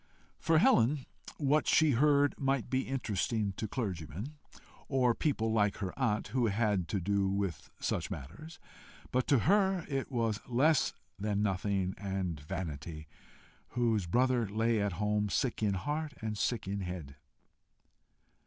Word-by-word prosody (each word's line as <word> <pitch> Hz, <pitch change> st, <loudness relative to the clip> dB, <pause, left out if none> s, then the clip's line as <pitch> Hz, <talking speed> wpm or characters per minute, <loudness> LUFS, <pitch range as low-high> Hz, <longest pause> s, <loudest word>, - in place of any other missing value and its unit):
For 165 Hz, -1 st, +3 dB
Helen, 135 Hz, -1 st, +4 dB, 0.3 s
what 150 Hz, +1 st, +2 dB
she 155 Hz, -1 st, +5 dB
heard 145 Hz, +2 st, +4 dB
might 135 Hz, -3 st, 0 dB
be 130 Hz, 0 st, 0 dB
interesting 110 Hz, -4 st, -1 dB
to 110 Hz, -, -2 dB
clergymen, 100 Hz, -, -4 dB, 0.5 s
or 130 Hz, -3 st, +3 dB
people 115 Hz, -5 st, 0 dB
like 105 Hz, -2 st, +2 dB
her 95 Hz, -3 st, -4 dB
aunt 115 Hz, -6 st, 0 dB
who 125 Hz, -2 st, +1 dB
had 105 Hz, -4 st, +1 dB
to 100 Hz, -, -1 dB
do 100 Hz, +1 st, +1 dB
with 95 Hz, -5 st, -2 dB
such -, -, -1 dB
matters, 100 Hz, -, -8 dB, 0.5 s
but 130 Hz, 0 st, +1 dB
to 140 Hz, -, +5 dB
her 190 Hz, -2 st, +3 dB
it 135 Hz, -1 st, -3 dB
was 115 Hz, -4 st, 0 dB
less 135 Hz, +5 st, +3 dB, 0.3 s
than 105 Hz, 0 st, 0 dB
nothing 95 Hz, -1 st, 0 dB
and 95 Hz, -5 st, -3 dB
vanity, 75 Hz, 0 st, -6 dB, 0.7 s
whose 115 Hz, -6 st, +2 dB
brother 120 Hz, +2 st, +2 dB
lay 110 Hz, +1 st, +1 dB
at 100 Hz, -2 st, 0 dB
home 105 Hz, +2 st, 0 dB
"sick 120 Hz, +3 st, 0 dB
in 100 Hz, -3 st, +2 dB
heart 150 Hz, +8 st, -3 dB
and 110 Hz, -1 st, -3 dB
sick 110 Hz, 0 st, -1 dB
in 100 Hz, +1 st, -2 dB
head." 85 Hz, -7 st, -6 dB
110 Hz, 145 wpm, -32 LUFS, 95-130 Hz, 0.7 s, she